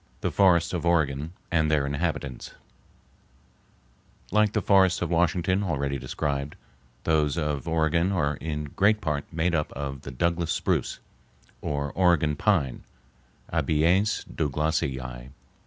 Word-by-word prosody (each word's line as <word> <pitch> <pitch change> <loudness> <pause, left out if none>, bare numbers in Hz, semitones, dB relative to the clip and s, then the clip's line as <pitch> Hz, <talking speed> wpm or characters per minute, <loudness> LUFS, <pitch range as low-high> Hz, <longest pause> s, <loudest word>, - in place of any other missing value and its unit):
The - - -1
Forests 90 -4 +3
of 90 - -2
Oregon 80 -2 +1 0.2
and 80 -2 +2
their 75 -3 +2
Inhabitants 70 -2 -3 1.8
Like 105 +1 +3
the - - +1
forests 95 -2 +4
of 85 - -3
Washington, 90 +3 +2
already 70 -7 -1
described, 70 +2 -3 0.5
those 75 -1 +1
of 75 -1 -2
Oregon 80 +3 +1
are 75 -6 0
in 75 -2 -4
great 105 +2 +3
part 75 -7 -3
made 85 +2 0
up 75 -2 0
of 70 -1 -5
the - - -8
Douglas 85 +5 -1
spruce, - - 0 0.6
or 70 -1 -2
Oregon 85 -5 +2
pine 75 - 0 0.7
(Abies 85 +7 +2
Douglasii). 65 -5 -2
80 Hz, 125 wpm, -26 LUFS, 70-85 Hz, 1.8 s, forests